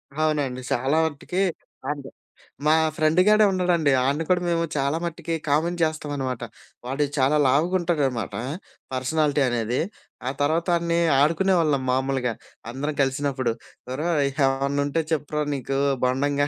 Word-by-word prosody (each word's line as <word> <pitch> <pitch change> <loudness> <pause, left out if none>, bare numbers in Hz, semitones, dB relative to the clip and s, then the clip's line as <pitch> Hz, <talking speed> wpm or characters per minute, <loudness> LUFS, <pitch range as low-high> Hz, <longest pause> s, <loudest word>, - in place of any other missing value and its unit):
అవునండి. 145 -5 0
చాలా 135 +6 +1
మటికి 160 +5 -3 0.5
అంతే. 140 -2 -6 0.6
మా 155 - +5 0.2
ఫ్రెండుగాడే 185 +7 +4
ఉన్నాడండి. 175 -5 +2
అడిని 140 +5 +1
కూడా 180 -1 +3
మేము 170 0 +1
చాలా 140 +3 +1
మటికి 170 0 -4 0.2
కామెంట్ 170 +4 +1
చేస్తామనమాట. 145 -6 -2 0.4
వాడు 135 +3 0
చాలా 135 +3 +3
లావుగుంటాడనమాటా 150 - 0 0.5
పర్సనాలిటీ 145 +3 +1
అనేది. 120 0 -1 0.5
ఆ - - +2
తర్వాత 160 +4 +1
ఆడినీ 170 0 0 0.2
ఆడుకునేవాళ్ళం 160 -3 +2
మామూలుగా, 130 -2 0 0.4
అందరం 145 +3 -3
కలిసినప్పుడు. 135 -2 0 0.4
ఒరే! 155 +6 -2 0.4
ఏవన్నుంటే 140 +3 0
చెప్పురా 150 0 -1
నీకూ 135 0 -2 0.2
బోండంగా 140 +3 +1
145 Hz, 115 wpm, -24 LUFS, 135-165 Hz, 0.6 s, మా